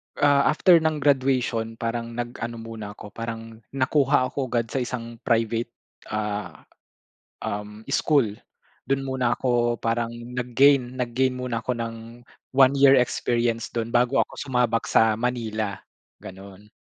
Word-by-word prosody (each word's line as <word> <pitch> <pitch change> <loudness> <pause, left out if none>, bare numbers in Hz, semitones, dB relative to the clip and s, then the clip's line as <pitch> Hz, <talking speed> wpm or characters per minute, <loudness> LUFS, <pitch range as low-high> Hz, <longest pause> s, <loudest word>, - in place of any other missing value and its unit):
ah, 140 -1 +4
after 170 +2 +5
ng 155 -2 -1
graduation 130 -5 +1
parang 115 0 -4
nag 120 +1 -5
ano 120 0 -4
muna 115 -2 -8
ako, 105 - -11
parang 115 -1 -7 0.2
nakuha 135 -1 +2
ako 135 -2 -2
agad 115 -2 -1
sa 135 - -1
isang 120 -2 -5
private 115 0 +1 0.4
ah 105 -2 -4 0.8
um, 105 +1 -5
school. 145 -5 +3 0.6
Dun 135 0 0
muna 130 -3 0
ako 120 -2 +1
parang 115 0 -1
nag-gain 125 +2 +2
nag-gain 125 +1 0
muna 125 -2 -3
ako 125 +1 -2
ng 115 -1 -4 0.6
1 135 -1 +7
year 140 -1 +6
experience 120 -1 0
dun 115 0 -4
bago 125 +2 +2
ako - - -23 0.2
sumabak 125 -3 +1
sa 110 -1 +4
Manila, 110 -5 -2 0.5
ganun. 100 +2 -12
120 Hz, 135 wpm, -24 LUFS, 115-130 Hz, 0.8 s, 1